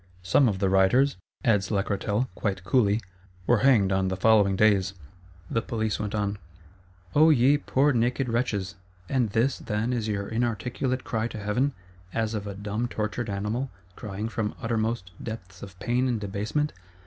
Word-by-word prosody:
Some 115 +8 +4
of 100 - -2
the 95 0 +1
rioters," 95 +8 +4 0.3
adds 105 -4 +3
Lacretelle, 100 +3 0
quite 95 -4 -2
coolly, 105 +1 +2 0.4
"were 120 +1 +4
hanged 110 -6 +4
on 95 0 +1
the 95 0 -2
following 100 -1 +4
days:" 100 -2 +3 0.5
the 115 - 0
Police 110 -3 -2
went 105 0 -3
on. 100 -1 -1 0.7
O 155 +2 +6
ye 140 -1 +5
poor 145 0 +2
naked 125 +3 +1
wretches! 115 -6 -1 0.3
and 125 -2 +1
this, 115 +6 +1
then, 115 +3 -1
is 115 -3 -1
your 100 -2 -2
inarticulate 120 +3 -1
cry 110 0 -1
to 115 - -8
Heaven, 110 +7 0 0.4
as 110 -1 0
of 105 -1 -3
a 100 - -5
dumb 105 +4 -2
tortured 110 +1 -3
animal, 105 +7 -2 0.3
crying 105 +1 -5
from 110 -2 -3
uttermost 115 -4 -1
depths 95 -5 -7
of 95 -2 -10
pain 120 +6 0
and 120 -3 0
debasement? 105 +9 -2
110 Hz, 160 wpm, -26 LUFS, 100-120 Hz, 0.7 s, O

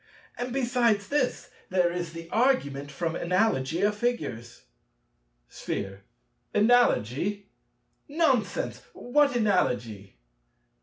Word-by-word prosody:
And 245 +1 -4
besides 240 -5 +1
this, 285 -4 -1 0.2
there 180 -2 +2
is 175 -2 -4
the 165 0 -8
Argument 145 - +1
from 165 +3 -3
Analogy 175 -4 0
of 205 +1 +2
Figures. 120 - -3 0.8
Sphere. 95 +7 -5 0.5
Analogy! 205 - +2 0.6
Nonsense: 280 -8 0
what 280 +2 +2
analogy? 120 - 0
200 Hz, 90 wpm, -27 LUFS, -, 0.8 s, there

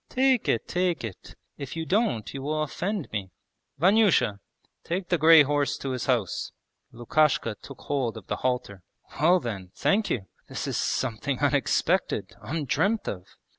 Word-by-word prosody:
'Take 260 -2 +2
it, - - 0
take 180 -3 0
it! 110 -5 -8 0.2
If 140 +1 -6
you 165 0 -3
don't 190 - 0
you 135 - -5
will 155 +2 -1
offend 180 +4 -3
me. 100 -3 -4 0.5
Vanyusha! 185 - +3 0.4
Take 180 +1 -3
the 175 - +2
grey 160 0 +8
horse 145 0 0
to 135 - -4
his 130 -1 -3
house.' 120 -8 0 0.4
Lukashka 120 0 +1
took 140 - -11
hold 130 -6 -2
of 105 - -10
the - - -3
halter. 125 -7 -2 0.4
'Well 175 +5 +5
then, 100 - -5
thank 205 +2 +1
you! 100 -6 -2 0.2
This - - -4
is - - -3
something 130 +2 -1
unexpected, 145 0 +1
undreamt 165 - -1
of.' 90 -2 -5
145 Hz, 155 wpm, -26 LUFS, 120-175 Hz, 0.5 s, grey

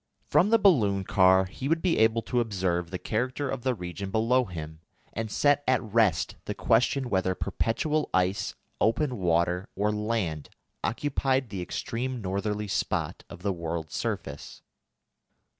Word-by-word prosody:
From 195 - +3
the 230 - +6
balloon 110 - +3
car 95 0 +4
he 130 +8 -6
would 165 +2 +1
be 180 -9 +2
able 110 +1 +3
to 125 - 0
observe 95 -6 -1
the 90 - -3
character 130 +8 -2
of 130 -1 -3
the 130 0 0
region 90 0 -6
below 115 +5 +2
him, 80 -4 -7 0.3
and 110 0 -3
set 145 +5 +3
at 130 -1 +4
rest 105 -7 +1
the - - -4
question 125 +3 +2
whether 95 -4 0
perpetual 150 +11 -1
ice, 95 +2 0 0.2
open 125 +4 +1
water, 90 +1 +1
or 105 +2 +1
land, 105 -8 -2 0.3
occupied 130 0 0
the 95 -3 -4
extreme 125 +7 -3
northerly 105 +1 -2
spot 95 - -2
of 90 - -11
the 100 -1 +1
world's 85 -2 -4
surface. 70 0 -4
105 Hz, 150 wpm, -27 LUFS, 95-125 Hz, 0.3 s, the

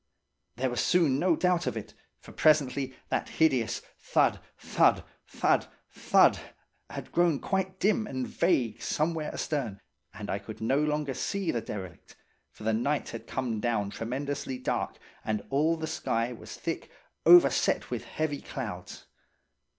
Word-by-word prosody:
There 130 +2 -1
was 120 - 0
soon 160 -7 +3
no 175 0 +3
doubt 180 +1 +1
of - - -1
it, 110 - -7 0.2
for - - -14
presently 140 -3 +2
that - - -1
hideous 125 -7 +1 0.2
thud, - - +2 0.2
thud, - - +3 0.2
thud, - - +1 0.2
thud - - +4 0.5
had - - -7
grown 170 -4 +3
quite 190 -1 -2
dim 215 +2 +2
and 130 -6 -3
vague 125 - +1
somewhere 155 0 -1
astern 120 -10 -3 0.3
and 105 -2 -8
I 100 - -1
could 105 +2 -9
no 130 +6 +1
longer 150 -2 0
see 195 +7 -1
the 115 - -1
derelict, 95 -5 -8 0.3
for - - -14
the 110 +1 +1
night 140 +6 0
had 115 - -8
come 120 -4 -2
down 105 -3 0
tremendously 130 +3 -3
dark 125 - -2 0.3
and 105 -2 -2
all 155 +4 +2
the 160 - -3
sky 120 -6 -1
was 115 - -9
thick, 165 - -4 0.3
overset 355 -1 +5
with - - -3
heavy 155 -2 -2
clouds. 100 -9 -7
135 Hz, 150 wpm, -29 LUFS, 115-160 Hz, 0.5 s, overset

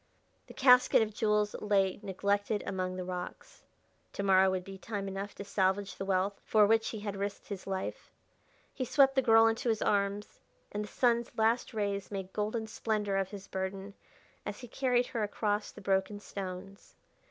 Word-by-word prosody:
The - - -12
casket 250 -3 +6
of 215 -1 -5
jewels 210 -1 +1
lay 195 -2 +1
neglected 205 +1 -1
among 185 -1 -2
the 185 - -4
rocks: 180 0 -7 0.5
to 200 - -3
morrow 190 -1 +5
would 185 -1 -1
be 195 0 -10
time 200 -1 -4
enough 195 +1 -5
to - - -6
salvage 195 0 0
the 195 - -5
wealth 195 +1 0
for 215 -1 +4
which 225 +1 +3
he 220 - -6
had 205 -1 -4
risked 200 +2 -4
his 195 -2 -6
life. 190 -1 -4 0.6
He 260 - -3
swept 270 +2 +4
the 265 - +3
girl 225 -2 +6
into 225 +3 +1
his 220 -1 +1
arms, 200 0 0 0.3
and 210 +1 -3
the - - -7
sun's 235 +1 +1
last 225 +2 +2
rays 200 -3 -2
made 190 -2 -5
golden 215 +2 -1
splendor 210 -2 -1
of 195 -1 0
his 200 -2 -9
burden 190 +1 -4 0.5
as - - -6
he 245 - -8
carried 250 0 +1
her 235 -2 -3
across 210 0 -1
the - - -12
broken 195 +1 0
stones. 195 0 -8
205 Hz, 180 wpm, -31 LUFS, 195-220 Hz, 0.6 s, casket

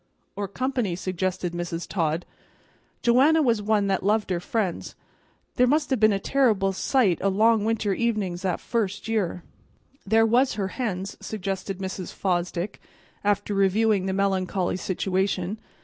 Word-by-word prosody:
"Or 205 -1 -3
company," 245 -3 -1
suggested 185 -1 -2
Mrs. 175 -1 -4
Todd. 165 -2 -1 0.8
"Joanna 280 +7 +5
was 230 -5 +2
one 210 -1 +2
that 195 -1 0
loved 210 0 +1
her 175 - 0
friends. 190 -1 -2 0.6
There 250 - +5
must 295 +2 +1
have 260 - +2
been 215 0 +5
a 200 - +1
terrible 205 -4 +2
sight 200 - +2
o' 195 - +2
long 215 +2 +3
winter 220 -3 0
evenin's 205 -6 -1
that 185 -3 -1
first 210 -3 -2
year." 200 -6 -1 0.6
"There 225 +3 +4
was 245 +3 +3
her 195 -2 -2
hens," 200 -5 -4
suggested 195 -2 -4
Mrs. 190 -1 -5
Fosdick, 180 +1 -2 0.4
after 205 0 0
reviewing 195 0 +2
the - - 0
melancholy 190 -2 0
situation. 190 +1 -1
200 Hz, 145 wpm, -25 LUFS, 185-225 Hz, 0.8 s, Joanna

